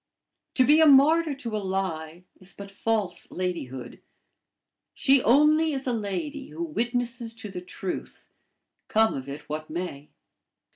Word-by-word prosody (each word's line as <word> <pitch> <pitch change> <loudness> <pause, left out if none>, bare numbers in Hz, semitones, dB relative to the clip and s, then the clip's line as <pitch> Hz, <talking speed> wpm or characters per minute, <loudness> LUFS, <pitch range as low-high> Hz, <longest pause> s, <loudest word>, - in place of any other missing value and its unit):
To 255 - +5
be 300 +4 +6
a 320 - +7
martyr 300 +2 +5
to 235 -5 -5
a - - 0
lie 180 -3 -3 0.2
is 185 +1 -12
but 200 0 -10
false 200 -3 -1
ladyhood. 165 -9 -5 0.9
She 270 -1 +4
only 300 +6 +4
is 270 -1 -3
a 250 - 0
lady 270 - -4
who 340 - -5
witnesses 240 -5 -2
to 215 -2 -8
the 180 -2 -6
truth, 180 +1 -7 0.5
come 220 +1 +3
of 135 0 -6
it 140 +2 -6
what 155 +1 -5
may. 155 -3 -5
220 Hz, 145 wpm, -26 LUFS, 180-275 Hz, 0.9 s, a